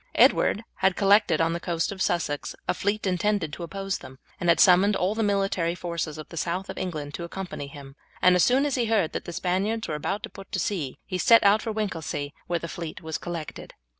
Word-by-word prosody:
Edward 215 - +4
had 190 -1 +2
collected 200 -5 +4
on 165 0 +2
the 170 - -2
coast 170 0 -1
of 195 -1 -6
Sussex 165 -6 -1
a - - +2
fleet 205 +2 -1
intended 185 -3 0
to - - -7
oppose 195 +2 -3
them, 130 - -12 0.2
and 175 - 0
had 170 - +5
summoned 195 +3 +6
all 185 +3 +1
the 225 - -2
military 195 -5 +1
forces 170 -3 -4
of 155 - -8
the 170 - -9
south 180 +4 -2
of - - -11
England 150 -5 -4
to 170 - -5
accompany 175 -4 -6
him; 140 -1 -11 0.2
and 180 0 +5
as 180 - +4
soon 265 +3 +4
as 290 - 0
he 245 -3 +1
heard 215 -7 +1
that - - -4
the - - -5
Spaniards 195 +6 -1
were 155 - -3
about 195 +8 -2
to 225 - -5
put 195 -1 -12
to 190 - 0
sea 165 -8 -2
he 185 -2 -3
set 230 +5 +6
out 205 +2 +5
for 225 - -3
Winchelsea, 165 -9 -3
where 175 - 0
the 170 - -5
fleet 165 -1 -7
was 160 -1 -3
collected. 170 -3 -7
180 Hz, 230 wpm, -26 LUFS, 165-200 Hz, 0.2 s, summoned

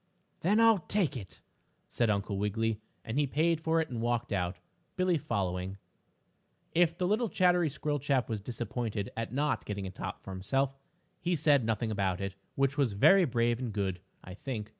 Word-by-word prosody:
"Then 205 +6 +3
I'll 225 -3 +6
take 180 -3 0
it," 100 -8 -8 0.5
said 120 -2 +1
Uncle 100 -1 0
Wiggily, 110 +2 0 0.2
and 115 +6 -1
he 145 - +2
paid 160 +4 +1
for 160 +1 +2
it 160 - -1
and 115 -2 -3
walked 120 -1 0
out, 90 -2 -1 0.4
Billie 185 -3 +2
following. 95 -8 -2 1.0
If 170 0 +3
the 180 - 0
little 220 +3 +1
chattery 180 -3 +3
squirrel 145 +1 -2
chap 135 -4 +1
was 110 -3 -3
disappointed 115 -2 -3
at 115 -1 -3
not 145 +3 0
getting 100 -1 -4
a 95 - -5
top - - -6
for - - -8
himself, 135 +9 0 0.5
he 175 +1 0
said 145 -4 +4
nothing 110 0 0
about 95 -3 0
it, 100 -1 -3 0.2
which 135 +1 +1
was 130 -7 +2
very 190 - +6
brave 120 -3 +1
and 125 -3 -3
good, 95 -3 -2 0.2
I 90 - -9
think. 110 0 -5
120 Hz, 180 wpm, -31 LUFS, 100-155 Hz, 1.0 s, I'll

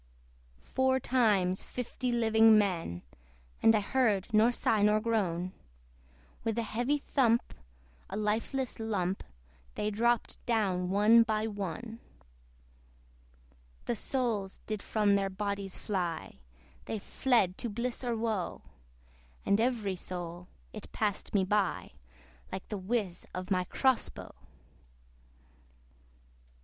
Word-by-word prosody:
Four 260 0 +1
times 210 -8 +2
fifty 250 0 -4
living 225 -2 +5
men, 170 - 0 0.6
(And 225 - +6
I 210 - +2
heard 220 -2 +1
nor 220 +3 +5
sigh 225 -3 +1
nor 210 +1 +4
groan) 185 -6 0 0.9
With 225 -1 -1
heavy 240 +5 0
thump, 245 -5 +1 0.6
a 195 - -4
lifeless 225 +5 -1
lump, 195 -4 -1 0.5
They 210 0 -1
dropped 235 +3 0
down 190 -6 +1
one 210 +4 +6
by 220 -1 +1
one. 210 +2 -5 1.9
The - - 0
souls 220 -5 -2
did 215 -2 -3
from 210 -2 +2
their 195 -1 +1
bodies 200 0 -3
fly, 175 - -3 0.5
They 220 - -3
fled 210 -3 +1
to 235 - -3
bliss 235 +4 -3
or 240 -2 -1
woe! 220 -5 -2 0.8
And 200 +2 +3
every 225 -6 0
soul, 175 -1 -6 0.3
it - - -9
passed 210 -3 -1
me 195 - +4
by, 195 -1 0 0.6
Like 190 - -6
the 210 - -3
whizz 195 -2 -2
of 185 +1 -5
my 185 -1 +2
CROSS 260 +6 +2
BOW! - - -10
215 Hz, 115 wpm, -31 LUFS, 195-235 Hz, 1.9 s, And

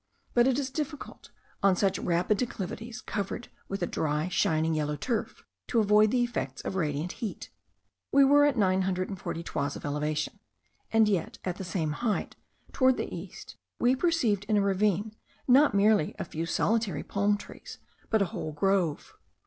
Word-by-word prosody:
But 240 +1 +4
it 265 -1 +2
is 270 -2 -2
difficult, 295 0 -6 0.3
on 195 -1 +4
such 195 0 +1
rapid 180 +4 +1
declivities, 225 0 -4
covered 205 +3 -4 0.2
with 195 -1 -3
a - - +3
dry, 155 +1 -1
shining, 165 -4 +1
yellow 150 -1 -1
turf, 230 - -3 0.2
to 235 - +2
avoid 210 0 +5
the 245 +2 +2
effects 145 - -3
of - - -3
radiant 155 -1 -1
heat. 220 -4 -5 0.6
We 280 0 +6
were 290 +1 +6
at 280 -3 0
nine 190 -2 +3
hundred 185 -1 -1
and 195 -3 -6
forty 165 - -4
toises 145 -3 -2
of - - -8
elevation; 150 +5 -2 0.5
and 225 -1 +5
yet 195 -5 -1
at 180 -1 -2
the 195 - -5
same 165 -3 -2
height, 215 +6 -2 0.4
towards 260 -1 +4
the - - -4
east, - - -9 0.2
we 245 +2 +4
perceived 260 - +1
in 210 0 +2
a - - +4
ravine, 200 +2 +1 0.3
not 270 -2 +5
merely 205 -5 +3
a - - -4
few 165 +1 -4
solitary 210 -2 0
palm 205 +1 +1
trees, 205 - -11 0.3
but 220 -2 +3
a 180 - -5
whole 155 - -4
grove. 180 -1 0
200 Hz, 175 wpm, -28 LUFS, 170-230 Hz, 0.6 s, We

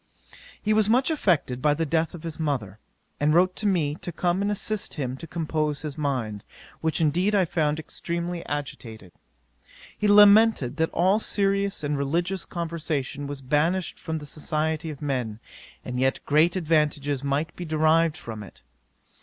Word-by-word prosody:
'He 215 - +1
was 215 -1 +3
much 255 +7 +3
affected 160 - +1
by 150 +1 +3
the 165 +2 -1
death 160 +2 0
of 170 - -11
his 165 -1 -6
mother, 125 -10 -2 0.4
and 150 +2 +3
wrote 185 +1 +4
to 215 - -1
me 165 -7 +1
to 175 - -5
come 175 +3 0
and 200 - 0
assist 210 0 -2
him 130 -4 -3
to 165 - -9
compose 155 -3 -2
his 150 -3 -4
mind, 125 -9 -2 0.4
which 160 -1 -1
indeed 175 +6 +2
I 190 -2 +4
found 155 -2 0
extremely 170 +2 -4
agitated. 115 -9 -6 0.8
He 210 - 0
lamented 205 - +6
that 160 0 +1
all 190 +5 +2
serious 200 -4 0
and 145 -1 -1
religious 170 +6 -1
conversation 155 -4 -3
was 140 -1 -6
banished 160 +7 0
from 160 0 -3
the 150 - -8
society 155 +2 -2
of 150 -1 -8
men, 125 -7 -2 0.5
and 125 0 -3
yet 130 +1 +1
great 160 +5 +3
advantages 150 -5 +1
might 140 +2 -1
be 180 - -6
derived 160 0 +2
from 110 -2 -7
it. 100 - -13
155 Hz, 165 wpm, -25 LUFS, 145-175 Hz, 0.8 s, lamented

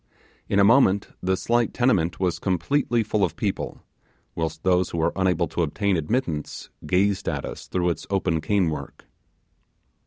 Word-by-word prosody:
In 100 - +1
a 100 - +6
moment 100 -3 +4
the 95 +1 0
slight 120 +2 0
tenement 100 -10 +1
was 90 -3 0
completely 115 - 0
full 105 -1 0
of 90 - 0
people, - - -3 0.5
whilst 80 0 -4
those 90 -1 +2
who - - -5
were 80 +1 +1
unable 90 -3 +1
to - - -2
obtain 95 +5 0
admittance 80 - -2 0.2
gazed 95 +1 +1
at - - -3
us - - -8
through 90 -1 0
its - - -6
open 90 -5 0
cane 90 0 +1
work. 70 -2 -7
95 Hz, 160 wpm, -24 LUFS, 85-100 Hz, 0.5 s, a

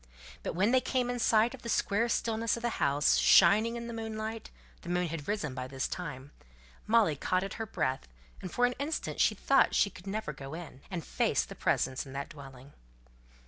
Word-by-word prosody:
But - - -4
when 200 +6 +2
they 260 0 +4
came 250 -1 0
in 245 - -3
sight 225 +1 +3
of 265 - -10
the 235 - -6
square 225 +2 +1
stillness 225 0 0
of 235 - -8
the 240 - -2
house, 145 +1 +3
shining 215 +6 +5
in 235 0 -5
the 235 - -6
moonlight 220 0 -5 0.3
the 170 - -9
moon 180 0 +1
had 150 -2 -6
risen 200 -10 -2
by 130 0 -5
this 135 0 -3
time 145 -6 -6 0.6
Molly 215 -8 +4
caught 185 +6 0
at 195 - -5
her 225 - -3
breath, 130 - -2 0.3
and 185 - -6
for 245 - +2
an 245 - +1
instant 295 +3 -2
she - - +4
thought - - +3
she 200 - +2
never 200 -6 -3
could - - -17
go 135 +2 -7
in, 160 -6 -9
and 175 -5 -5
face - - +1
the - - -9
presence 130 0 0
in 135 - -10
that 140 0 -4
dwelling. 135 -3 -12
195 Hz, 210 wpm, -30 LUFS, 145-230 Hz, 0.6 s, shining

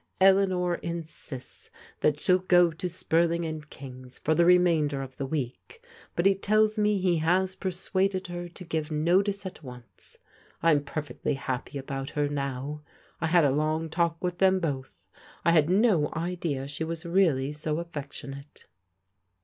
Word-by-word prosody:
Eleanor 190 -2 +4
insists 160 -6 -7 0.3
that 150 -1 +2
shell 185 +3 +3
go 180 -2 +4
to 170 +3 -4
Spurting 170 0 +1
and 155 -1 -6
King^s 130 -2 -11
for 155 - +1
die 170 - +3
remainder 170 -5 +4
of 130 -1 -10
the 135 - -3
week, 155 - -5 0.3
but 170 - 0
he 195 - +6
tells 215 +2 +2
me 210 -1 +3
he 180 -2 +2
has 185 +4 +2
persuaded 190 +1 -1
her 175 0 -6
to 180 +2 -11
give 160 -2 -3
notice 190 +6 +1
at 185 -2 -7
once. 125 -4 -12 0.5
I'm 155 -4 +4
perfectly 145 0 -3
ha^y 135 +2 -4
about 135 0 -5
her 145 -1 0
now. 140 +1 -3 0.4
I 165 - 0
had 170 -1 +4
a 140 - +3
long 155 +2 0
talk 170 0 +1
with 180 -1 -2
them 190 0 +4
both. 140 -6 -4 0.4
I 170 - +5
had 160 -2 +4
no 190 -6 +3
idea 165 -5 -2
she 145 +3 -4
was 165 0 -4
reallv 160 -6 +2
so 150 0 -2
affectionate." 145 -3 -8
165 Hz, 155 wpm, -27 LUFS, 145-180 Hz, 0.5 s, he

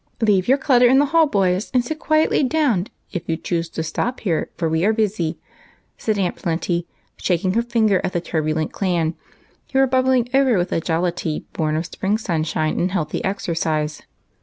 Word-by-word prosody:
'' - - -41
Leave 200 -4 +3
your 265 +3 +5
clutter 255 -3 +4
in 260 +2 +5
the 285 - +5
hall, 325 +2 +4
boys, 190 -3 +1
and 245 -1 +3
sit 310 +4 -4
quietly 310 0 +2
down 260 - +1 0.2
if 175 - -3
you 165 - 0
choose 170 -1 -2
to 160 - -4
stop 235 +10 -3
here, 170 -7 -1
for 170 -1 0
we 160 +1 0
are 215 +3 +3
busy," 205 -7 -1 0.6
said 215 -2 -1
Aunt 185 -3 0
Plenty, 170 +1 -2 0.3
shaking 185 +1 0
her 230 - +2
finger 225 -5 +2
at - - -1
the 175 - +1
turbulent 155 -2 -1
clan, 170 -4 0 0.6
who 265 - 0
were 270 - +6
bubbling 255 -1 +2
over 265 -5 +4
with 175 +1 0
the 165 - -1
jollity 165 -1 -1
born 155 -1 -1
of 160 +2 -1
spring 200 +4 -1
sunshine 155 -6 -1
and 180 +1 0
healthy 165 -5 -2
exercise. 160 -5 -2
185 Hz, 190 wpm, -21 LUFS, 165-240 Hz, 0.6 s, were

